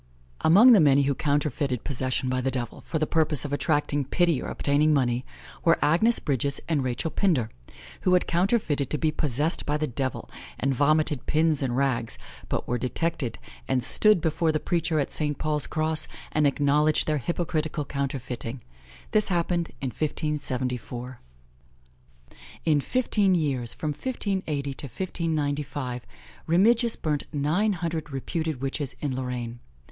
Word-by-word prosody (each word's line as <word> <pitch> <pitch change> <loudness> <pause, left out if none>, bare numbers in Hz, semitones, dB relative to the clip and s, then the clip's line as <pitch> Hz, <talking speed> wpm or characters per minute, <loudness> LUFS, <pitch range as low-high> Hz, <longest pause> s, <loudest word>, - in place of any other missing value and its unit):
Among 210 +10 +7
the 215 - +7
many 140 -3 +5
who 140 +1 +1
counterfeited 140 -3 -1
possession 130 -1 -1
by 130 0 0
the 135 - 0
devil, 125 -2 -4
for 160 - -3
the 155 - +1
purpose 155 -2 +2
of 145 - -4
attracting 145 -1 +1
pity 170 0 +1
or - - -5
obtaining 150 +2 +2
money, 125 -2 +1 0.4
were 165 0 +5
Agnes 175 +11 +3
Bridges 140 -1 -1
and 150 -5 +1
Rachel 130 +5 -2
Pinder, 150 - +1 0.5
who 180 - +3
had 180 - +2
counterfeited 170 - +1
to 150 - -1
be 155 0 +1
possessed 150 +2 0
by 150 0 0
the 155 - 0
devil, 130 -1 -3 0.3
and 135 +1 +1
vomited 145 0 +2
pins 155 -1 +2
and 125 -2 -1
rags; 130 -4 0 0.3
but - - -2
were 120 0 -1
detected, 130 -1 -2 0.3
and 125 -2 +1
stood 215 - +4
before 160 +1 +1
the 155 - 0
preacher 165 -2 0
at 140 - -1
St. 150 -2 -1
Paul's 150 -2 -1
Cross, 155 0 0 0.2
and 150 -1 +3
acknowledged 145 +2 +3
their 155 -1 0
hypocritical 155 +1 -2
counterfeiting: 130 -3 -4 0.5
this 215 -1 +3
happened 175 -1 0
in 135 - -1
1574. 130 -5 -3 1.5
In 150 -3 +3
fifteen 210 - +1
years, 135 -8 0
from 155 - -2
1580 160 - -3
to 140 - -4
1595, 145 -6 -3 0.4
Remigius 225 +8 +4
burnt 150 -2 -2
nine 160 +9 +1
hundred 165 -3 -3
reputed 155 +1 -3
witches 135 0 -2
in 140 -4 -2
Lorraine. 125 -2 -4
150 Hz, 150 wpm, -26 LUFS, 135-165 Hz, 1.5 s, Among